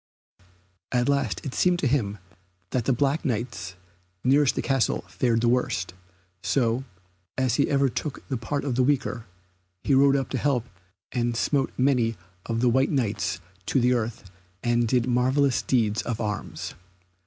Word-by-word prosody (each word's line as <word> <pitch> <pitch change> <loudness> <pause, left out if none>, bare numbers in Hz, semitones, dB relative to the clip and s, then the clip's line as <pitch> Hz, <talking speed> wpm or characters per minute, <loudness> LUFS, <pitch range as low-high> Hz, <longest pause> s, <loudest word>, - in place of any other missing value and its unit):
At 125 -1 +1
last 140 -5 0
it 135 - -4
seemed 180 -1 +3
to 155 - 0
him 110 -6 0 0.5
that 125 -3 0
the - - +3
black 140 +4 +1
Knights 105 -7 -3 0.5
nearest 140 +1 +4
the - - -1
castle 135 -3 +1
fared 115 +6 +1
the 120 - +2
worst, 115 -8 0 0.5
so, 125 -1 +1 0.5
as 130 -2 +1
he 140 - +2
ever 140 -1 +3
took 135 +2 -5
the 135 - -2
part 140 +5 -3
of 135 - 0
the 125 - +2
weaker, 130 -4 0 0.6
he 140 - +2
rode 135 +1 +6
to 135 -1 +1
their - - -3
help 130 -5 +1 0.5
and 120 -1 -1
smote 135 +1 +1
many 125 -4 +2 0.3
of 115 0 -1
the 125 - +4
white 130 +3 +3
Knights 110 -8 -1 0.3
to 135 - +2
the 125 +1 +3
earth 115 -2 -2 0.4
and 120 -1 +2
did 125 +1 +2
marvellous 130 +2 +2
deeds 110 -4 +1
of 115 -1 -3
arms. 105 -2 -4
125 Hz, 165 wpm, -26 LUFS, 115-135 Hz, 0.6 s, rode